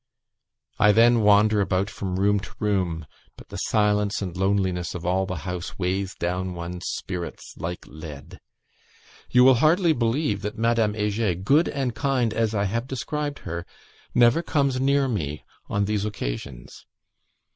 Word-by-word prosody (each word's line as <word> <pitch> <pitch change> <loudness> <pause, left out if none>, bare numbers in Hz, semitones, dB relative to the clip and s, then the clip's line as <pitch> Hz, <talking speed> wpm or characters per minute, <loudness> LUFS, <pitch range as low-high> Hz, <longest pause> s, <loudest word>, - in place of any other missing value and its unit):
I 105 0 +6
then 115 +2 +5
wander 105 0 +5
about 95 0 0
from 95 -2 -4
room 100 +1 +3
to - - -9
room, 90 -6 -1 0.3
but - - -14
the - - -6
silence 105 -1 +1
and 95 -3 -5
loneliness 95 -2 0
of 85 -1 -6
all 95 +2 +1
the 90 - -3
house 90 -1 -5
weighs 95 +1 -2
down 90 +1 -2
one's 85 +1 -6
spirits 90 -2 -5
like 85 +2 -5
lead. 75 +2 -10 0.9
You 125 - +5
will 130 +1 +8
hardly 165 +2 +4
believe 115 -3 0
that 105 +2 -5
Madame 115 -2 +2
Heger 105 -2 0
(good 135 - +2
and 135 -4 -2
kind 125 -4 0
as 110 -1 0
I 100 - +1
have 115 +5 -2
described 145 +2 -3
her) 85 +1 -4 0.5
never 120 +6 +5
comes 140 -5 0
near 140 0 +3
me 75 - -3 0.3
on 100 0 +1
these 105 -1 -1
occasions. 60 - -6
105 Hz, 155 wpm, -24 LUFS, 90-120 Hz, 0.9 s, will